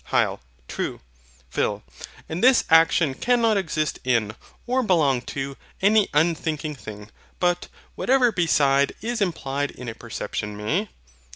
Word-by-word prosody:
HYL. - - +1 0.3
True. - - -4 0.5
PHIL. - - -1 0.4
And 165 +6 -4
this 255 0 +6
action 165 -2 +5
cannot 235 - +2
exist 155 -6 -1
in, 115 -4 +1 0.3
or 255 +2 +1
belong 155 - +2 0.2
to, 135 0 -3 0.2
any 205 +1 +4
unthinking 155 -1 0
thing; 105 -5 -10 0.3
but, 175 0 +1 0.3
whatever 255 -2 +3
beside 140 -7 +2
is 235 0 -2
implied 145 -6 -1
in 125 - -10
a 115 - -4
perception 105 -1 -5
may? 165 - -1
160 Hz, 125 wpm, -24 LUFS, 135-205 Hz, 0.5 s, this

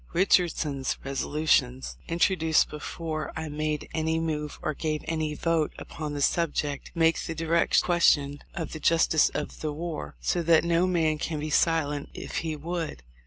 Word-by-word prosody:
Richardson's 165 -7 +2
resolutions, 130 - 0
intro 175 +3 +2
duced 160 -2 +2
before 155 +1 -4
I 160 -1 -4
made 150 0 -2
any 160 0 0
move 150 -2 -3
or 155 - 0
gave 155 0 -3
any 155 -2 -1
vote 165 -2 0
upon 150 -2 -6
the 145 - 0
subject, 145 -4 0
make 165 0 +3
the 165 - -4
direct 165 +1 +2
question 145 -5 +3
of 170 -4 -4
the 155 - -5
justice 165 -1 +4
of 150 - -4
the 155 - -2
war; 160 +1 -5
so 175 - 0
that 165 -1 +4
no 170 +1 +2
man 160 -4 +1
can 155 -1 -2
be 155 +1 -4
silent 145 -3 +1
if - - -5
he 160 -2 -2
would. 160 - -4
155 Hz, 165 wpm, -27 LUFS, 150-165 Hz, -, justice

